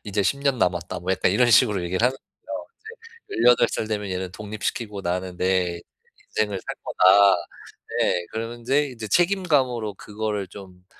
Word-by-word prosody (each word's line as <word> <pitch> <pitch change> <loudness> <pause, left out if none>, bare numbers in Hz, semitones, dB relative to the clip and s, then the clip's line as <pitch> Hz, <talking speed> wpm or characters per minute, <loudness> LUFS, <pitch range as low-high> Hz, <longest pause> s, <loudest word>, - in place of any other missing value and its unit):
"이제 105 0 -1
10 140 +8 0
년 140 -3 +1
남았다." 90 -2 -1
뭐 90 +2 -3
약간 95 - +1
이런 120 +3 +3
식으로 105 -5 +4
얘기를 95 +5 -1
하는 130 +1 -1 0.3
거예요. - - -5 0.6
이제 115 - -2
"18 125 -1 +6
살 110 - -2
되면 105 -2 -3
얘는 90 0 -3
독립시키고 105 0 -4
나는 90 0 -3
내 90 -2 0 0.6
인생을 105 -3 0
살 - - -4
거다." 100 +1 +5 0.7
네. 90 0 +1
그러는데 120 +6 -1
이제 115 -4 -7
책임감으로 140 - +1
그거를 105 -1 -4
좀 90 -1 -13
105 Hz, 320 characters per minute, -24 LUFS, 95-120 Hz, 0.7 s, 18